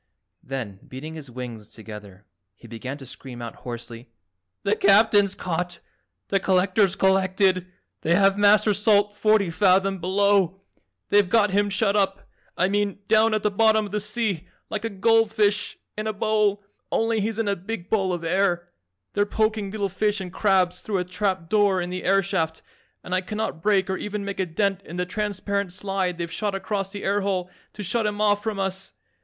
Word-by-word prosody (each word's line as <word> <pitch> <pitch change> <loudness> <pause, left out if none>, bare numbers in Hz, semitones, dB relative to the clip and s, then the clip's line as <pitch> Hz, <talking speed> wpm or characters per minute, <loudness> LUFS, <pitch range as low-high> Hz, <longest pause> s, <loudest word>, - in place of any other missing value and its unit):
Then, 120 -8 -6
beating 145 +5 -8
his 155 -4 -9
wings 120 -4 -8
together, 105 -3 -11 0.3
he - - -15
began 130 +4 -6
to 135 - -11
scream 125 -1 -10
out 115 -1 -7
hoarsely, 120 0 -8 0.5
"The 200 +1 +2
Captain's 205 -1 +4
caught! 175 0 -3 0.5
The 195 - +2
Collector's 190 +1 +2
collected. 190 -1 +2 0.3
They 170 +2 +2
have 195 +1 +4
Master 205 +1 +5
Salt 205 0 +3
forty 215 -4 +3
fathom 195 +1 +3
below. 190 0 +2 0.5
They've 205 -2 +4
got 210 -2 +3
him 205 +1 +2
shut 200 +1 +1
up, 195 -2 0 0.3
I 180 - +3
mean 205 0 0
down 220 0 +4
at 215 - -2
the 210 - +2
bottom 220 +1 +3
of 200 - -9
the 210 - -1
sea 210 -4 -1 0.2
like 215 0 -3
a 225 - -1
gold 225 +2 +3
fish 210 -1 +1 0.2
in 215 +1 -3
a 215 - -1
bowl, 210 -1 +1 0.3
only 225 -1 +1
he's 220 +1 -2
in 225 -2 -1
a 200 - +1
big 190 -1 -6
bowl 195 -4 +2
of 175 -2 -3
air. 175 0 +1 0.4
They're 205 0 +1
poking 215 -1 0
little 200 0 -2
fish 205 +2 0
and 185 -1 -7
crabs 185 -3 +2
through 205 -3 -2
a 180 - 0
trap 185 -1 -2
door 205 -1 +3
in 175 0 -3
the 185 0 -4
air 195 +1 +3
shaft 165 -4 -2 0.4
and 180 - -5
I 185 - +2
cannot 210 -3 -4
break 195 -1 +2
or 190 - -1
even 210 -1 -4
make 200 -1 -5
a 190 - 0
dent 195 +3 0
in 175 -2 -9
the 180 - 0
transparent 200 0 -2
slide 190 -1 -2
they've 170 -1 -4
shot 205 -2 -2
across 195 0 -3
the 205 -1 -7
air 200 +1 +1
hole 185 -2 -2 0.2
to 210 - -7
shut 220 +3 0
him 205 0 -3
off 205 -1 +3
from 215 -1 -3
us. 195 0 -3
195 Hz, 190 wpm, -24 LUFS, 180-210 Hz, 0.5 s, Master